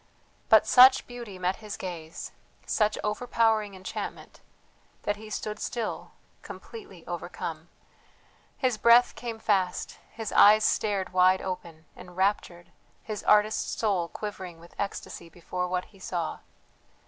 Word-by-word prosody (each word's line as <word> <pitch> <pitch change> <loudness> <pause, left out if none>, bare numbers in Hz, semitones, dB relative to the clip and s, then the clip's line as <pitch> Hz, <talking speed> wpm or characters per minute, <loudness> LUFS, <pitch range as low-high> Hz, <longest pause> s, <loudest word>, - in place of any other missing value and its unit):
But - - +7
such 260 +1 +7
beauty 235 -6 -9
met 185 +1 -1
his 215 -2 -7
gaze, 170 -3 -7 0.3
such 210 0 +1
overpowering 215 -2 +1
enchantment, 185 0 -7 0.6
that 205 0 -1
he 215 0 -11
stood 210 0 -4
still 235 -3 -4 0.3
completely 455 -2 -11
overcome. - - -6 0.9
His 250 -5 0
breath 235 +1 +6
came 235 -2 -6
fast, 195 -5 -1
his 225 -2 -5
eyes 215 +1 +7
stared 200 -4 0
wide 185 +1 +4
open, 170 -4 -6
enraptured, 180 -1 -2 0.3
his 215 -3 -5
artist's 210 +1 +3
soul 195 -6 +1
quivering 185 -3 -7
with 170 +1 -16
ecstasy 195 -3 -5
before 180 +2 -4
what 180 0 -2
he 195 - -21
saw. 175 -3 -3
205 Hz, 125 wpm, -27 LUFS, 180-220 Hz, 0.9 s, But